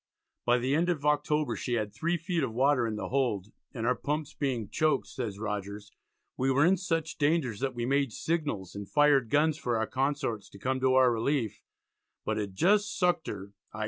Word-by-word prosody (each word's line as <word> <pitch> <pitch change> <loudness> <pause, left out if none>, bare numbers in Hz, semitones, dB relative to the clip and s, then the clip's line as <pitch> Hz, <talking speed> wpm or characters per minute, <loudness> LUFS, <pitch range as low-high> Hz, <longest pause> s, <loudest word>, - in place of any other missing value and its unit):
By 120 0 +4
the 130 +3 0
end 170 +4 +2
of 150 -5 -1
October 150 0 +1
she 125 - -3
had 110 -3 -1
3 170 +2 0
feet 170 0 -2
of 130 -5 -1
water 130 0 +2
in 110 - -3
the 105 - -4
hold, 115 -7 0 0.2
"and 115 -3 -4
our 125 - +3
pumps 150 +2 -3
being 125 -7 -2
choaked," 155 -1 +1
says 110 -6 -5
Rogers, 105 -1 -5 0.4
"we 130 +1 0
were 140 +3 +4
in 190 +2 +4
such 165 -3 -2
danger, 145 -6 +2
that 130 +1 -2
we 120 -1 -2
made 140 -1 +1
signals, 145 - -2
and 100 -1 -7
fired 145 -5 +4
guns 150 +3 +2
for 120 -4 0
our 110 - +1
consorts 130 -5 -2
to - - -13
come 130 +6 -1
to 130 0 +3
our 130 -1 +6
relief, 115 -1 -1 0.6
but 110 - -1
had 100 -3 -4
just 205 - +2
sucked 175 -3 +1
her 100 0 -6 0.2
(i. 110 - -7
130 Hz, 205 wpm, -29 LUFS, 110-150 Hz, 0.6 s, our